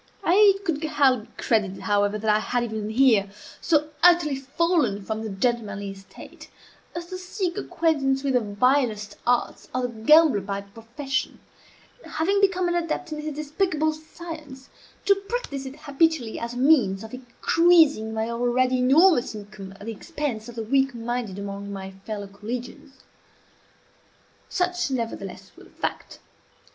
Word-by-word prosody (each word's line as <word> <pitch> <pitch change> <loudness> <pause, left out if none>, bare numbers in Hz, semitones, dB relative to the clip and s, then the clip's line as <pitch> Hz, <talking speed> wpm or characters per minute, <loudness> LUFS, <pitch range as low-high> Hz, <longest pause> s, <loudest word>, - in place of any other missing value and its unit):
It 395 +2 +5
could 320 -3 -1
hardly 265 -7 +2
be - - -26
credited, 205 -5 0
however, 205 0 +1
that 215 0 +2
I - - +2
had 245 +2 -1
even 220 -2 -4
here, 220 -4 +4 0.3
so 305 -2 +1
utterly 345 -5 +5
fallen 270 - 0
from 220 +1 -3
the 220 - -4
gentlemanly 205 -1 -2
estate 195 0 -13 0.5
as 345 0 -4
to 370 +1 -7
seek 365 -1 -3
acquaintance 280 -5 0
with 275 -1 0
the 250 - +4
vilest 215 0 0
arts 245 0 0
of 255 - 0
the 245 - -1
gambler 300 -3 +6
by 200 +1 -4
profession, 235 +8 -4 0.6
and, - - -12
having 395 +5 +1
become 370 -2 +2
an 345 - 0
adept 345 0 -2
in 305 - -5
his 305 -1 -5
despicable 310 +1 0
science, 310 -4 -10 0.4
to 400 - +6
practise 395 - -5
it 280 +3 -11
habitually 285 -5 0
as 235 +1 -5
a - - -5
means 250 -8 +3
of 220 - -10
increasing 280 0 +3
my 220 0 -2
already 245 +2 +1
enormous 270 0 +4
income 205 -2 -9
at 200 +1 -12
the 230 - -3
expense 225 0 -5
of 240 - -10
the 225 - -3
weak 270 +2 +1
minded 235 -4 -3
among 200 0 -6
my 195 -1 -6 0.2
fellow 210 -2 -4
collegians. 245 +7 -8 1.5
Such, 360 -3 0
nevertheless, 235 -4 -5
was - - -15
the - - -24
fact. - - -5
255 Hz, 155 wpm, -25 LUFS, 220-315 Hz, 1.5 s, gambler